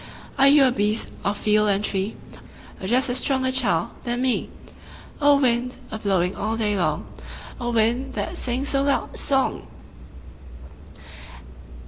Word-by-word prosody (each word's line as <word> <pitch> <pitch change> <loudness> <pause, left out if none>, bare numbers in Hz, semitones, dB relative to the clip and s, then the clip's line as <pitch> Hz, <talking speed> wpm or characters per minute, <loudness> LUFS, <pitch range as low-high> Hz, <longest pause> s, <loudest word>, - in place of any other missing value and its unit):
Are 275 - +6
you 280 0 +6
a 255 - +3
beast 215 -1 0
of 205 +1 -1
field 210 0 +2
and 200 +1 +1
tree, 195 +2 -2 0.7
Or 190 - -5
just 255 +5 +2
a 245 - -1
stronger 260 0 +2
child 240 -3 +2
than 240 0 -2
me? 255 -2 0 0.7
O 285 -1 +5
wind, 250 -1 0
a 220 - -5
blowing 190 -3 0
all 220 +2 -3
day 210 -2 0
long, 155 -5 -1 0.5
O 240 -1 -3
wind, 240 +3 0
that 340 - -3
sings 260 -2 -2
so 275 - +1
loud 280 0 -1
a - - -10
song! 270 -1 0
240 Hz, 150 wpm, -23 LUFS, 210-265 Hz, 0.7 s, Are